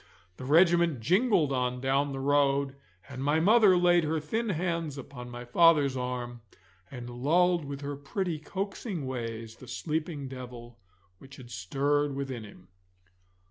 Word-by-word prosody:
The 130 - -8
regiment 170 0 +4
jingled 180 - +2
on 125 -1 -1
down 135 +2 +1
the 135 - -5
road, 140 0 +2 0.3
and 130 -1 -6
my 145 +3 +2
mother 205 +1 +5
laid 175 -1 +4
her 160 +1 0
thin 220 +10 -2
hands 165 -4 -2
upon 125 -2 -9
my 120 0 -8
father's 145 0 +4
arm, 125 -1 -4 0.5
and 125 -2 -8
lulled 165 +7 +2
with 140 0 -6
her 145 0 -4
pretty 160 +4 -3
coaxing 195 - -4
ways 115 -3 -5
the 130 - -13
sleeping 150 +2 -3
devil 120 -2 -9 0.4
which 135 0 -13
had 125 -3 -12
stirred 140 +8 0
within 135 -4 -4
him. 95 -4 -14
140 Hz, 145 wpm, -29 LUFS, 125-165 Hz, 0.5 s, mother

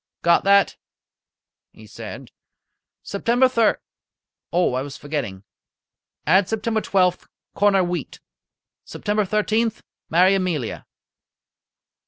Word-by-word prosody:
"Got 170 0 +4
that?" 200 0 +4 1.0
he - - -15
said. - - -9 0.7
"September 245 +3 +2
thir 230 -4 +2 0.7
Oh, 175 -5 +2
I 130 - -1
was 140 0 -7
forgetting! 135 -11 -5 0.8
Add 185 +4 +3
September 220 0 -1
twelfth, 180 -3 +1 0.3
corner 200 -2 +3
wheat. 175 -4 -4 0.6
September 210 0 -2
thirteenth, 215 +3 0 0.3
marry 180 +4 +4
Amelia." 175 - -2
190 Hz, 95 wpm, -22 LUFS, 170-215 Hz, 1.0 s, Got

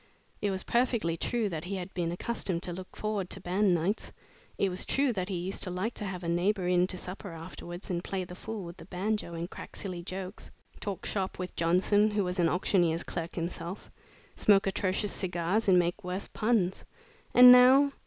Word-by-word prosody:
It 205 - +1
was 190 -1 -1
perfectly 235 -9 +1
true 230 +5 -1
that 165 -2 -5
he 195 +2 -3
had 185 0 -6
been 170 -2 -1
accustomed 180 -2 -2
to 175 - -3
look 185 +1 -9
forward 210 -4 -2
to - - -5
band 185 +1 +2
nights. 180 +6 -1 0.5
It 195 - +2
was 185 0 0
true 275 -2 +1
that 185 -2 -3
he 190 - -2
used 185 +3 -3
to 185 - -1
like 185 +6 -2
to 210 - -4
have 185 -2 -5
a - - -4
neighbor 180 +2 +1
in 180 0 +3
to 185 - -4
supper 185 +1 -7
afterwards, 175 +2 -8
and 175 0 -2
play 190 -1 -3
the 180 - -9
fool 215 +2 -6
with 170 0 -9
the - - -11
banjo 190 -1 -2
and 165 +1 -3
crack - - -10
silly 185 -3 -4
jokes; 185 +2 -6 0.3
talk 200 -2 -4
shop 190 -2 -2
with 180 0 -5
Johnson, 185 +5 +3
who 210 -1 0
was 180 0 -3
an 170 -1 +4
auctioneer's 175 -2 +1
clerk 170 -1 -5
himself; 170 +2 -5 0.4
smoke 200 -2 +4
atrocious 195 +1 0
cigars 180 +4 -1
and 185 -2 +6
make 175 +4 +1
worse 180 +2 -3
puns. 215 -5 0 0.5
And 250 0 +11
now! 260 +3 +7
185 Hz, 205 wpm, -30 LUFS, 175-205 Hz, 0.5 s, And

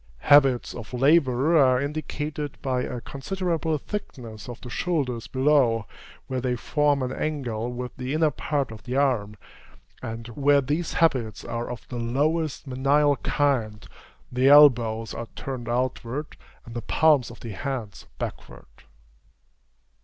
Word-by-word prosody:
Habits 135 -4 +5
of 115 +1 -9
labor 140 +2 +3
are 130 -2 +5
indicated 150 0 -4
by 130 -2 0
a 125 -1 -4
considerable 165 +3 -2
thickness 120 - -7
of 120 - -8
the 125 - -8
shoulders 135 -10 -1
below, 130 -5 +2 0.4
where 130 -1 -3
they 125 -1 0
form 145 +2 +1
an 125 - -2
angle 125 -7 -3
with 125 0 -6
the 130 +3 -3
inner 155 -1 +3
part 140 -6 -2
of 110 -1 -10
the 125 +4 -5
arm; 125 -7 +1 0.7
and, 115 +1 -6
where 140 +4 +3
these 150 +5 -2
habits 130 -9 +1
are 120 0 -4
of 125 -2 -8
the 125 - -5
lowest 150 +7 -1
menial 140 +2 +2
kind, 120 -9 -1 0.4
the 125 +2 +2
elbows 120 -6 +6
are 115 - -6
turned 125 -3 -5
outward, 130 +3 -2 0.3
and 115 - -10
the 120 - -4
palms 150 -5 +3
of 120 - -13
the 115 - -6
hands 115 -1 -5
backward. - - -7
130 Hz, 140 wpm, -25 LUFS, 120-145 Hz, 0.7 s, elbows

